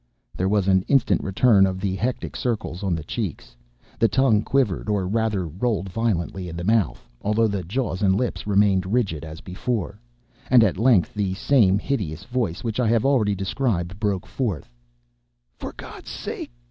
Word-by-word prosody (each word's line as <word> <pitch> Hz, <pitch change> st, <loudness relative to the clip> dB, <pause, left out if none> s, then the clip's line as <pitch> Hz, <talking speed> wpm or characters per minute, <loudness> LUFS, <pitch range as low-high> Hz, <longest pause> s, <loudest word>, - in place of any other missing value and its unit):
There 95 Hz, +1 st, 0 dB
was 100 Hz, -2 st, +1 dB
an 95 Hz, -1 st, +4 dB
instant 135 Hz, -4 st, +3 dB
return 100 Hz, 0 st, +4 dB
of 95 Hz, 0 st, -3 dB
the 95 Hz, -1 st, -1 dB
hectic 120 Hz, +6 st, -3 dB
circles 110 Hz, -7 st, -3 dB
on 95 Hz, -4 st, 0 dB
the 80 Hz, -, -5 dB
cheeks; 80 Hz, -, -5 dB, 0.4 s
the 115 Hz, -, +5 dB
tongue 110 Hz, 0 st, +3 dB
quivered, 110 Hz, -6 st, 0 dB
or 100 Hz, -3 st, 0 dB
rather 105 Hz, -3 st, 0 dB
rolled 95 Hz, +3 st, -2 dB
violently 95 Hz, -4 st, -2 dB
in 85 Hz, -, -7 dB
the 85 Hz, -, -4 dB
mouth 110 Hz, 0 st, +1 dB
(although 105 Hz, +2 st, +2 dB
the 100 Hz, -3 st, -2 dB
jaws 105 Hz, +1 st, -2 dB
and 95 Hz, -2 st, +3 dB
lips 120 Hz, 0 st, -2 dB
remained 100 Hz, -2 st, +3 dB
rigid 100 Hz, -11 st, 0 dB
as 80 Hz, 0 st, -8 dB
before), 105 Hz, +2 st, -3 dB, 0.5 s
and 125 Hz, -2 st, +7 dB
at 100 Hz, -, +1 dB
length 115 Hz, -7 st, +4 dB
the 100 Hz, -3 st, -1 dB
same 100 Hz, -4 st, +3 dB
hideous 100 Hz, -, -3 dB
voice 120 Hz, -9 st, -2 dB
which 115 Hz, 0 st, -2 dB
I 125 Hz, -, +2 dB
have 115 Hz, +1 st, +2 dB
already 115 Hz, -7 st, +3 dB
described, 95 Hz, -2 st, -2 dB
broke 100 Hz, -4 st, -1 dB
forth: 100 Hz, -, -3 dB, 0.9 s
"For -, -, -5 dB
God's -, -, -10 dB
sake! -, -, -6 dB
100 Hz, 170 wpm, -23 LUFS, 95-115 Hz, 0.9 s, and